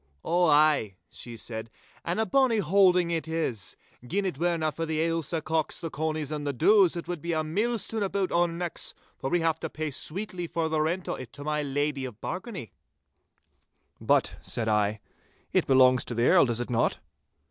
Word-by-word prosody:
'Ow 175 +1 +3
ay,'she 130 -6 +1
said, 110 0 -6 0.3
'and 170 +4 -2
a 220 - +2
bonny 260 -2 +3
holding 180 -2 +4
it 165 -1 -2
is. 155 - -2 0.3
Gin 195 +11 -1
it 175 -7 -3
werena 165 -2 +1
for 165 - -4
the 160 -1 -1
Ailsa 165 -1 -1
cocks, 155 -1 -1
the 165 - -5
conies, 155 -1 -2
and 150 -1 -3
the - - +1
doos, 190 - +5
it 170 - -5
wad 175 -4 -4
be 170 +1 -2
a 155 0 0
mill 210 +10 0
stone 220 +1 -1
aboot 195 -1 -1
our 175 0 +3
necks, 170 0 -5 0.2
for 135 - -2
we 175 +2 +1
have 165 -1 +1
to - - -4
pay 155 -1 -4
sweetly 175 +5 -3
for 165 -1 -1
the 155 -1 +1
rent 175 +4 -1
o' - - -1
it 125 -3 -8
to 145 - -9
my 150 0 -1
Lady 145 0 -1
of 120 -4 -8
Bargany.' 185 - -6 1.3
'But,' - - +1
said 115 -2 -3
I, 105 -1 +1 0.5
'it - - +2
belongs 130 -2 +5
to 120 - -5
the 120 +1 +2
Earl, - - +6
does 120 -1 0
it 120 - -5
not? 115 -1 +1
160 Hz, 195 wpm, -27 LUFS, 135-175 Hz, 1.3 s, Earl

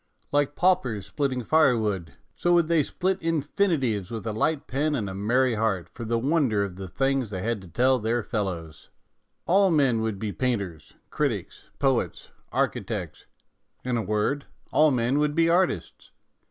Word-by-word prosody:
Like 145 0 +1
paupers 135 - +1
splitting 125 +6 -2
firewood, 110 - +2 0.2
so 175 0 +2
would 170 -2 +3
they 165 -2 +3
split 185 +6 -1
infi 165 +4 0
nitives 110 -9 -2
with 115 -2 -6
a 110 - -2
light 145 +7 0
pen 150 +4 0
and 110 -7 -2
a 95 - -5
merry 120 +6 +2
heart 105 -5 -1
for 120 - -7
the 115 +1 0
wonder 130 -5 +2
of 95 -3 -5
the 95 0 -7
things 135 +3 0
they 95 -3 -4
had 115 -2 -1
to 95 - -12
tell 125 +9 +2
their 115 +1 0
fellows. 90 - -4 0.6
All 195 +2 +4
men 135 -8 +3
would 110 -3 -2
be 105 +1 -3
painters, 100 - -3 0.2
critics, - - -2
poets, 135 -4 0 0.2
architects; - - -2 0.6
in 125 -1 0
a 115 - +1
word, 110 +7 -1 0.3
all 155 0 +6
men 125 +1 +1
would 150 0 +1
be 165 0 +3
artists. 175 - 0
125 Hz, 165 wpm, -26 LUFS, 105-145 Hz, 0.6 s, all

